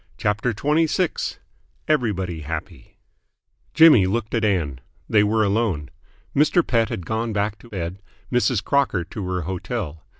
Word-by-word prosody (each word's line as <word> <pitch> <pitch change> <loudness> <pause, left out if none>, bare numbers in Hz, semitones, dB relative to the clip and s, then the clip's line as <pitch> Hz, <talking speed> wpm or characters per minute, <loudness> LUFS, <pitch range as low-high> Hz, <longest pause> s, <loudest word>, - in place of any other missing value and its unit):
CHAPTER 105 +4 0
XXVI 155 - 0 0.5
EVERYBODY 100 - 0
HAPPY 75 +1 -7 0.8
Jimmy 150 - +7
looked 110 +3 -2
at 115 -2 +1
Ann. 85 -11 0 0.3
They 105 -2 +4
were 110 +1 +2
alone. 100 -8 0 0.4
Mr. 155 +4 +3
Pett 115 -3 +1
had 90 - -5
gone 110 0 -2
back 105 +1 -1
to 120 - -16
bed, 95 -2 -5 0.3
Mrs. 125 -3 +2
Crocker 140 -10 +1
to 95 +2 -6
her 90 -1 -1
hotel. 90 -1 -4
105 Hz, 135 wpm, -22 LUFS, 90-120 Hz, 0.8 s, Jimmy